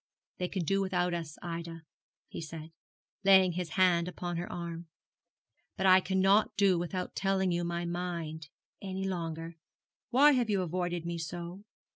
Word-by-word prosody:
'They 180 - 0
can 185 -1 -3
do 195 +4 +1
without 180 -2 0
us, 165 -3 -5
Ida,' 165 -1 -6 0.4
he - - -7
said, 160 0 -8 0.5
laying 190 -2 +6
his 175 -2 -4
hand 180 -2 +4
upon 175 -1 -4
her 175 - -4
arm; 170 -1 -6 0.9
'but 190 - -1
I 185 0 +8
cannot 195 +3 +2
do 195 -3 +4
without 180 +1 -3
telling 190 -1 +1
you 175 0 0
my 170 0 -2
mind 170 -3 -4 0.3
any 190 -1 -4
longer. 165 -2 -4 0.5
Why 280 +4 +6
have 245 -5 +1
you 195 -3 +2
avoided 175 0 -2
me 170 0 -3
so? 175 +4 -6
175 Hz, 155 wpm, -31 LUFS, 170-190 Hz, 0.9 s, I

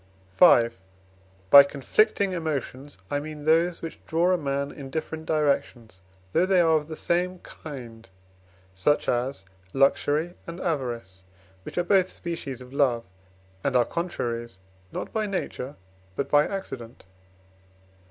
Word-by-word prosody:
V. 115 +4 +7 0.8
By 140 - +12
conflicting 185 +8 +1
emotions 145 - -4
I 145 - +1
mean 150 0 -8
those 165 +2 +2
which 165 - -7
draw 170 +3 +2
a - - +4
man 140 -1 -2
in 135 -2 -9
different 160 +2 -5
directions, 135 -9 -1 0.3
though 180 - +3
they 190 -1 +4
are 165 -2 +4
of 150 -1 0
the 160 - -6
same 180 +3 0
kind, 120 -7 -10 0.6
such 95 +11 +1
as 120 -4 -1 0.3
luxury 145 +4 +2
and 170 +1 -7
avarice, 120 - -3 0.4
which - - -10
are 175 - +2
both 185 0 +3
species 150 -7 -6
of 125 +1 -12
love, 130 -5 +2 0.6
and 140 -2 0
are 120 -1 +5
contraries, 120 - -4 0.3
not - - -5
by 215 -1 0
nature, 150 -8 -4 0.4
but 140 - -3
by 145 0 +5
accident. 130 - -7
145 Hz, 135 wpm, -26 LUFS, 125-170 Hz, 0.8 s, By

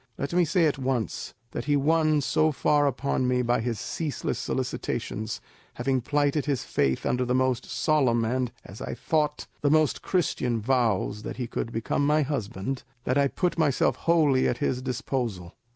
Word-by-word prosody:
Let 140 - -3
me 175 0 +4
say 165 +2 +3
at 145 -3 +1
once 125 -6 -2 0.2
that - - -4
he 145 0 +2
won 155 +1 +3
so 155 +3 +2
far 145 +1 +2
upon 130 -1 0
me 125 0 +2
by 120 -1 +1
his 115 -2 -2
ceaseless 155 -4 -3
solicitations, 105 0 -3 0.4
having 130 +1 0
plighted 145 +2 +1
his 140 -4 0
faith 65 -2 0
under 125 0 +1
the 125 0 0
most 130 -1 +1
solemn 130 -7 +2
and, 125 +1 -1
as 95 - -11
I - - -4
thought, 150 -2 0 0.2
the 145 - +2
most 155 -1 +3
Christian 125 -10 0
vows 110 -4 +1
that - - -6
he 125 -2 -3
would 115 - -2
become 115 +5 -1
my 150 +1 +3
husband, 125 -3 -3 0.2
that 130 +2 +1
I 140 - +4
put 175 +4 -1
myself 145 -5 +2
wholly 155 -6 +3
at - - 0
his 125 -1 -1
disposal. 120 -8 -3
130 Hz, 175 wpm, -27 LUFS, 120-150 Hz, 0.4 s, me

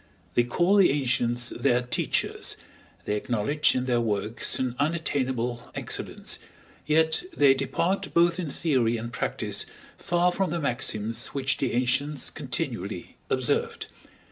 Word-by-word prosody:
They - - +4
call 175 +11 +2
the 195 - +7
ancients 120 -3 +1
their 125 -2 +2
teachers, 125 - 0 0.5
they 105 - 0
acknowledge 120 +7 +1
in 125 0 0
their 120 -2 +2
works 105 0 0
an 130 -2 -1
unattainable 130 -6 -1
excellence, - - -3 0.5
yet 160 +1 +3 0.2
they 140 -2 +7
depart 180 +7 -1
both 170 +1 +3
in 170 -5 -2
theory 130 -7 +1
and 115 +1 -6
practice - - -2 0.4
far 175 +1 +2
from 190 +1 0
the 170 +2 -1
maxims 120 -4 -1
which 135 -1 +1
the 135 - -1
ancients 130 +4 0
continually - - -4
observed. - - 0
130 Hz, 130 wpm, -27 LUFS, 120-160 Hz, 0.5 s, the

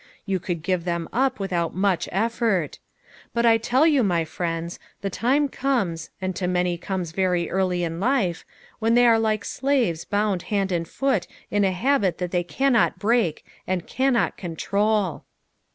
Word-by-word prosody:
You 195 -2 0
could 170 -2 -4
give 180 -1 0
them 170 -1 -2
up 260 0 +1
without 175 -4 -1
much 190 -1 +1
effort; 220 - 0 0.6
but 235 0 +2
I 225 -1 +5
tell 250 +6 +3
you, 295 -5 +4
my 175 -6 +1
friends, 165 +1 -4 0.2
the 195 - -3
time 270 +8 +2
comes, 235 - -1
and 185 -1 -3
to 180 - -1
many 180 0 +1
it 170 - -7
comes 185 -4 -3
very 180 -1 0
early 185 -2 0
in 165 0 -3
life, 205 -6 +1 0.4
when 225 +1 +2
they 245 0 +6
are 230 -1 +5
like 215 -1 0
slaves 250 - 0
bound 205 -3 0
hand 195 -2 0
and 170 -2 -1
foot 265 -8 0 0.2
in 205 0 +2
a 190 - +3
habit 200 -1 +1
that 180 -1 -3
they 175 - +1
cannot 245 +2 +2
break, 205 -5 +1 0.2
and 185 -2 -1
cannot 260 -2 +1
control." 200 +1 -1
195 Hz, 170 wpm, -24 LUFS, 175-230 Hz, 0.6 s, they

